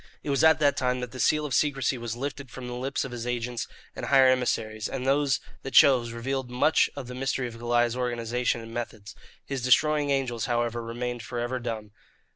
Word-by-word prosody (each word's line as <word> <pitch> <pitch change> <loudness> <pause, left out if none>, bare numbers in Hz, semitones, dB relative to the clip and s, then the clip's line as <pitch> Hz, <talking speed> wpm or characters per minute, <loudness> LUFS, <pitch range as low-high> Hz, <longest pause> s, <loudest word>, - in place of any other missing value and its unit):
It 145 - -2
was 140 - +2
at 160 0 +7
that 145 -2 +2
time 125 -1 0
that 125 -1 -5
the 130 - -9
seal 150 +3 +2
of 140 - -4
secrecy 135 0 +1
was 120 -2 -4
lifted 140 +1 -5
from 125 +2 -8
the 125 - -5
lips 130 +3 -2
of 135 - -7
his 120 -1 -5
agents 120 -1 -2 0.3
and - - -5
higher 135 -2 +6
emissaries, 110 -4 0
and 130 -1 -4
those 140 -1 +2 0.2
that 135 - -6
chose 125 -4 +6
revealed 130 +2 -3
much 125 +6 +3
of 140 -2 -6
the 125 - -8
mystery 130 0 -1
of 115 -1 -10
Goliah's 120 0 +1
organization 120 -1 -1
and 115 0 -10
methods. 110 -3 -6 0.3
His 135 -2 -3
destroying 145 +4 +3
angels, 130 -4 0
however, 120 -1 -1
remained 120 +1 -4
for 120 +3 -6
ever 120 +2 -2
dumb. 110 -3 -5
125 Hz, 210 wpm, -27 LUFS, 120-135 Hz, 0.3 s, at